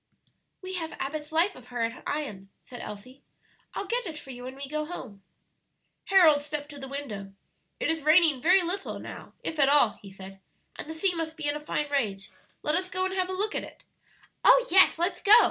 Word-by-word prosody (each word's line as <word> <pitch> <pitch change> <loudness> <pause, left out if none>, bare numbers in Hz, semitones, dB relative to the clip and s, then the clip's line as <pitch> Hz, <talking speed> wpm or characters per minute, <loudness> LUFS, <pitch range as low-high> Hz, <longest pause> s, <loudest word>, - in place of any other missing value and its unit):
"We 375 0 -6
have 325 -2 -4
Abbott's 300 +2 -5
life 340 +5 +2
of 250 -1 -14
her 245 -2 -2
at 230 +2 -3
Ion," 210 -11 -4
said 245 -1 -10
Elsie. 235 +6 -9 0.5
"I'll - - -3
get 475 +2 -1
it 315 -2 -6
for 270 -3 -9
you 245 0 -9
when 260 +1 -7
we 275 0 -6
go 305 +2 -2
home." 255 - -8 0.8
Harold 335 -7 +6
stepped 290 0 -5
to 290 -1 -9
the 270 - -7
window. 215 -9 -6 0.5
"It - - +1
is 325 -1 -2
raining 310 -2 +5
very 365 +4 +5
little 380 +3 -2
now, - - -9
if 320 - -4
at 275 -1 +5
all," 280 -7 +4
he 200 - -11
said, 195 0 -11 0.4
"and - - -8
the 320 - -5
sea 360 +3 +1
must 325 -1 -4
be 310 - -5
in 290 - +1
a - - -3
fine 300 0 -2
rage; 205 -9 -1 0.3
let 300 - +1
us 365 +2 0
go 370 0 -1
and 375 - -2
have 370 -1 -1
a - - -2
look 415 +3 -1
at - - -2
it" - - -12 0.6
"Oh, - - +7
yes, 380 -2 +6
let's 345 +3 -1
go!" 410 - +6
300 Hz, 220 wpm, -28 LUFS, 255-355 Hz, 0.8 s, Oh